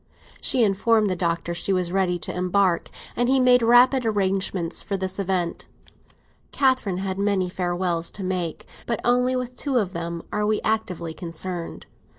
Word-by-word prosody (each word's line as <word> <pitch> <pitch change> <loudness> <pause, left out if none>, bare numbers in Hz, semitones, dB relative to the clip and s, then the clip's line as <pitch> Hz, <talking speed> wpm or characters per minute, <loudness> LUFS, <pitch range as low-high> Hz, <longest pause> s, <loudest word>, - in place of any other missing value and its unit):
She 250 - +3
informed 210 +1 +2
the - - 0
Doctor 170 -1 -1
she 175 +3 -1
was 180 -2 0
ready 185 -2 +1
to - - -4
embark, 180 -1 +1 0.3
and 245 +1 +1
he 265 0 +4
made 250 -1 +5
rapid 245 +3 +5
arrangements 195 -5 -1
for 200 - -3
this 190 +1 -3
event. 185 -3 -1 0.8
Catherine 260 -9 +1
had 190 0 -3
many 200 -3 +1
farewells 175 -2 -1
to 200 - -5
make, 180 -3 -3 0.2
but 235 - 0
with - - -7
only 250 +1 +2
two 255 +2 -2
of 200 -6 0
them 170 0 -4
are 210 - -1
we 215 0 +1
actively 185 -7 -2
concerned. 170 0 -6
Mrs. - - -35
190 Hz, 165 wpm, -24 LUFS, 175-225 Hz, 0.8 s, made